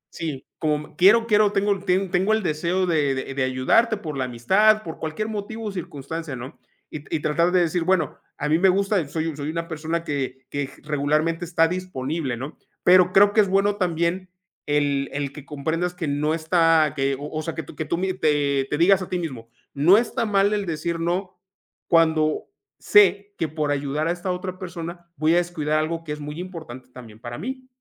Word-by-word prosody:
Sí, 150 -5 -5
como: 150 -1 -2
"Quiero, 210 +7 +6
quiero 210 -2 +4
tengo 200 -1 +1
ten 185 0 +1
tengo 195 +4 +2
el 220 -2 +1
deseo 175 +4 0
de 150 -5 +1
de 130 +1 -4
de 140 -1 0
ayudarte 130 - +2
por 155 -7 -6
la 130 -1 -1
amistad, 195 - +3
por 160 -2 -8
cualquier 160 +7 -3
motivo 220 +1 -5
o 210 - -2
circunstancia, 160 -3 -6
¿no? 125 +2 -9 0.3
Y 155 - -5
t 145 - -5
y 155 - 0
tratar 170 +4 +1
de 180 -1 +4
decir: 170 +1 0
"Bueno, 180 -5 0 0.2
a 150 - -2
mí 160 +2 +3
me 190 0 +5
gusta, 195 -4 +1
soy 160 0 -3
soy 145 +1 -4
una 165 +1 -3
persona 160 +1 -3
que 130 -4 -4
que 145 -1 -2
g - - -18
regularmente 155 +3 0
está 165 -1 +3
disponible", 160 -7 -3
¿no? 140 +5 -8 0.2
Pero 180 0 +6
creo 205 +2 +5
que 215 - +6
es 200 - 0
bueno 200 +1 +2
también 180 0 -1 0.4
el 145 -1 +1
el 140 -1 -3
que 145 -1 -10
comprendas 165 +5 -2
que 165 -4 -4
no 150 +3 0
está 165 -2 +3
que 135 0 0
o 145 +1 -6
o 155 0 -3
sea, 165 0 -5
que 160 - -4
tú 145 - -13
que 155 - -4
tú 170 - -1
mi 185 +1 -1
te 145 -5 +1
te 150 - -1
digas 190 +4 +5
a 185 - -6
ti 180 - -1
mismo: 130 -9 -6 0.2
"No 170 +9 +5
está 230 -1 0
mal 200 0 +3
el 205 -3 -1
decir 165 +1 -2
no, 180 +3 -2 0.5
cuando 160 -2 +3 0.3
sé 200 0 +4
que 160 - 0
por 150 -1 -2
ayudar 145 +2 -1
a - - +1
esta 180 +1 -3
otra 185 0 -5
persona 170 -1 -7
voy 155 +1 +2
a - - +4
descuidar 155 -3 0
algo 165 +1 -2
que 155 - -7
es 150 - -4
muy 150 +2 -7
importante 160 -9 -8
también 115 -4 -12
para 120 +2 -7
mí". 260 - -6
165 Hz, 210 wpm, -23 LUFS, 150-185 Hz, 0.5 s, Quiero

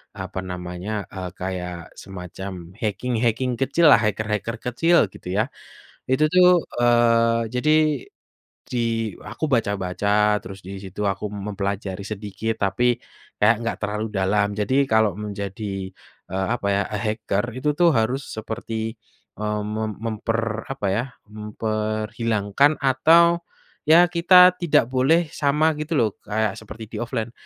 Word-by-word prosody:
apa 95 0 -5
namanya, 90 +2 -5 0.2
eee, 95 -1 -5
kayak 90 -1 -4 0.3
semacam 90 -1 -8
hacking 115 +3 -1
hacking 125 +3 -2
kecillah 140 -2 +5
hacker-hacker 105 +2 -1
kecil 165 +8 +3 0.2
gitu - - -12
ya 110 - +4 0.7
itu 150 +4 +3
tuh, 180 0 +7 0.3
eee 115 -1 +4
jadi, 150 +5 +2 1.0
di 125 - -1 0.5
aku 155 - -3
baca-baca 105 0 +1
terus 95 0 -9
di 100 - -6
situ 95 +2 -7
aku 95 +2 -6 0.2
mempelajari 100 -1 -3
sedikit 105 +2 -3
tapi, 120 +5 +1 0.5
kayak 110 +2 +5
nggak 115 - -2
terlalu 105 +1 -2
dalam 100 +2 +2
jadi 120 +5 0 0.2
kalau 110 -1 +4
menjadi, 100 -1 -5 0.4
eee, 95 0 -1
apa 100 - -4
ya 100 - +1 0.2
hacker 105 -1 -1
itu 140 +3 0
tuh 175 - +6
harus 125 +5 +1 0.2
seperti, 110 0 -4 0.4
mmm, 105 0 -1
me 110 - -2 0.2
memper 115 0 -1 0.3
apa 135 -7 -4
ya 115 - 0 0.3
memperhilangkan 110 +3 0
atau, 165 +6 +5 0.5
ya 170 +3 +8
kita 180 +1 +7
tidak 170 -8 +3
boleh 135 +6 +4
sama 150 +2 +2
gitu 155 +2 -3
loh 110 -2 +3
kayak 110 -1 -1
seperti 110 +1 -10
di-offline 120 -1 -3
110 Hz, 125 wpm, -23 LUFS, 100-125 Hz, 1.0 s, ya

